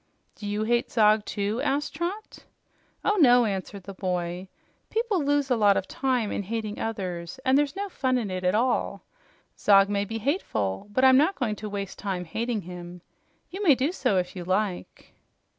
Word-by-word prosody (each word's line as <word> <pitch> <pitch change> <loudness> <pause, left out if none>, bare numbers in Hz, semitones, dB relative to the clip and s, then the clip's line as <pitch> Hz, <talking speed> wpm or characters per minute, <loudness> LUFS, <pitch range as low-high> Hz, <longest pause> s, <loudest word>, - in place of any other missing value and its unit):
"Do 205 - -8
you 205 +1 -1
hate 240 +2 +1
Zog, 215 -1 +4
too?" 205 +4 -2
asked 285 +1 -1
Trot. 360 +7 -4 0.7
"Oh 420 0 +2
no," 245 -5 +6
answered 195 -1 -4
the 195 - -8
boy. 180 -1 -3 0.4
"People 440 -7 0
lose 285 -1 +1
a - - +5
lot 205 -3 +4
of 190 - -2
time 250 -5 -1
in - - -2
hating 215 +1 -4
others, 180 -4 -4
and 260 0 +4
there's 290 +3 +2
no 400 +1 -3
fun 260 -8 0
in 215 -6 -3
it 185 0 -4
at 180 +2 +2
all. 245 +3 0 0.6
Zog 195 -1 +5
may 200 0 0
be 225 +2 -4
hateful, 200 - -2
but 255 +5 +3
I'm 260 0 +7
not 320 +8 +3
going 230 -6 -1
to 215 - -6
waste 200 -2 -5
time 190 -3 -3
hating 225 +6 -2
him. 175 0 -9 0.5
You 380 +3 -6
may 320 -9 +6
do 270 +6 0
so, 205 - 0
if 180 +1 -2
you 180 - -5
like." 185 +1 -3
215 Hz, 190 wpm, -26 LUFS, 195-265 Hz, 0.7 s, I'm